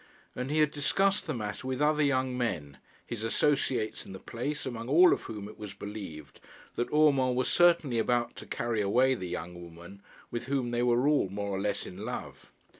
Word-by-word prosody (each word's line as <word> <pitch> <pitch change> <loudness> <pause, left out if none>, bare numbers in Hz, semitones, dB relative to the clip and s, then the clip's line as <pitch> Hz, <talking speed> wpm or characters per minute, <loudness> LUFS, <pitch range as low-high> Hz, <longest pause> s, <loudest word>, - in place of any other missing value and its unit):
And 125 +1 -3
he 155 +1 +2
had 150 -1 +3
discussed 195 +8 +1
the 155 - -1
matter 105 +2 -4
with 130 -1 -2
other 150 +1 +3
young 130 -3 +1
men, 85 - -3 0.3
his 115 -2 -5
associates 120 -2 +1
in - - -10
the 95 - -8
place, 140 +9 -4
among 120 -2 -5
all 175 +5 +7
of - - -2
whom 105 -3 -6
it 105 - -12
was 105 -2 -7
believed 100 -8 -8 0.3
that 120 - -2
Urmand 140 -4 +4
was 130 0 +1
certainly 165 -9 +4
about 120 +1 0
to - - -9
carry 115 -2 -1
away 125 +6 +3
the 95 -8 -5
young 90 0 -6
woman 85 +3 -12 0.3
with 120 0 -3
whom 130 -3 -1
they 120 0 0
were 120 +2 +3
all 145 -10 +3
more 100 +1 -4
or 95 0 -2
less 105 0 -1
in 90 - -9
love. 125 +2 -7
120 Hz, 200 wpm, -30 LUFS, 100-140 Hz, 0.3 s, all